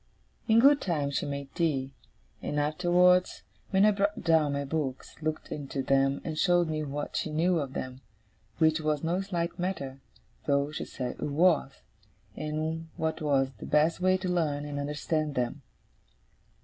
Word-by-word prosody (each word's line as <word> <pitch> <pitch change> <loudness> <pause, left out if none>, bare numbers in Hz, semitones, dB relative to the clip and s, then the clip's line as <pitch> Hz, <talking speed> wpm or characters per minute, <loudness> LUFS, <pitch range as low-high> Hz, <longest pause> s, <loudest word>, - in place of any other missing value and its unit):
In 225 0 +5
good 280 +3 +6
time 150 -6 -1
she 140 - -1
made 140 -1 -5
tea; 135 -5 0 0.5
and 150 - -2
afterwards, 180 +4 +3 0.3
when 195 +1 +4
I 215 - +6
brought 200 0 -1
down 160 -4 +3
my 140 0 -2
books, 135 -3 -3
looked 155 0 -3
into 140 -2 -4
them, 135 +1 +2
and 155 -2 -4
showed 175 -2 +3
me 155 -1 -1
what 145 0 -4
she - - -1
knew 165 +3 +2
of 135 -3 -4
them 130 0 -5 0.6
(which 160 0 +3
was 150 -1 0
no 175 +3 0
slight 175 -4 -3
matter, 140 -8 -3 0.5
though 140 0 +2
she 150 - -4
said 125 -2 -5
it - - -9
was), 150 -2 +2 0.5
and 155 +2 -3
what 160 -2 -2
was 135 -3 +2
the - - -7
best 155 +3 +2
way 185 0 +4
to 185 0 -4
learn 155 -5 0
and 145 -1 -4
understand 150 +1 -2
them. 120 -1 -2
155 Hz, 165 wpm, -29 LUFS, 140-175 Hz, 0.6 s, good